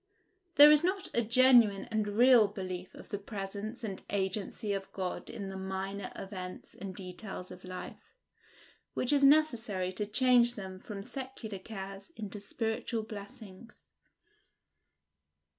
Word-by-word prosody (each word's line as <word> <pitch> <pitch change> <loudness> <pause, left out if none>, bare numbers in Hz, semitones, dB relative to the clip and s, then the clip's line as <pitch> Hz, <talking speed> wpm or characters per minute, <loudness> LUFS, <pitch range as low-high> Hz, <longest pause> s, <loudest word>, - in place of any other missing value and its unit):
There 295 +1 +10
is 300 +1 +6
not 375 0 0
a 235 - +3
genuine 235 -3 +5
and 215 -1 0
real 230 +1 +6
belief 185 -2 -6
of - - -12
the 205 - -3
presence 205 +3 -6
and 195 -4 -4
agency 200 +2 -2
of 195 -1 -4
God 185 -2 -4
in 200 -3 -6
the 190 - -6
minor 190 +1 -4
events 185 -2 -7
and 190 -1 -7
details 185 0 -7
of 180 0 -11
life, 185 - -9 0.8
which 255 - +1
is 280 -1 +3
necessary 235 -11 +3
to 205 +2 -3
change 245 +2 +4
them 190 -2 -7
from 200 0 -7
secular 250 -6 -6
cares 195 - -8
into 210 -1 -6
spiritual 225 +2 -2
blessings. 210 0 -11
205 Hz, 135 wpm, -31 LUFS, 190-235 Hz, 0.8 s, There